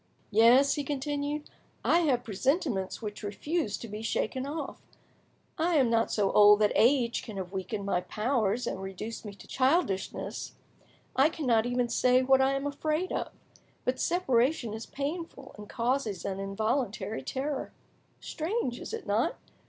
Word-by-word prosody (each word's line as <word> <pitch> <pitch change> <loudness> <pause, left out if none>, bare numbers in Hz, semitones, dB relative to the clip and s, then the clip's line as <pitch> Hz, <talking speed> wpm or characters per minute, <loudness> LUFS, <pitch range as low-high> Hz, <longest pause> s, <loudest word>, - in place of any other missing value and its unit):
"Yes," 235 +6 +6
he 290 - -2
continued, 290 +1 -3 0.4
"I 340 - +5
have 275 -8 +2
presentiments 230 - -1
which 210 -1 -5
refuse 215 - -2
to 235 - -8
be 210 0 -6
shaken 240 +4 -1
off. 310 +3 -5 0.8
I 335 +1 +2
am 260 -6 +4
not 230 0 +2
so 200 -2 +1
old 210 0 +8
that 210 - +4
age 240 0 +3
can 215 -3 -8
have 185 -1 -5
weakened 200 +2 -4
my 180 -3 +1
powers 225 +1 0
and 190 - -3
reduced 195 +4 -6
me 205 -1 -7
to - - -14
childishness, 260 - -1 0.6
I 275 +4 +5
cannot 245 -8 +1
even 245 0 +1
say 250 +2 +3
what 265 0 +5
I 270 +1 +3
am 275 +1 -2
afraid 310 +5 -1
of, - - -2 0.5
but 255 +1 0
separation 265 -8 +1
is 220 +1 -6
painful 285 -1 -5
and 210 0 -11
causes 235 -3 -1
an 195 -1 -3
involuntary 210 +1 -2
terror. 275 +1 -3 0.5
Strange, 320 - -2
is - - -5
it 455 - -8
not? - - +1
250 Hz, 155 wpm, -29 LUFS, 210-285 Hz, 0.8 s, old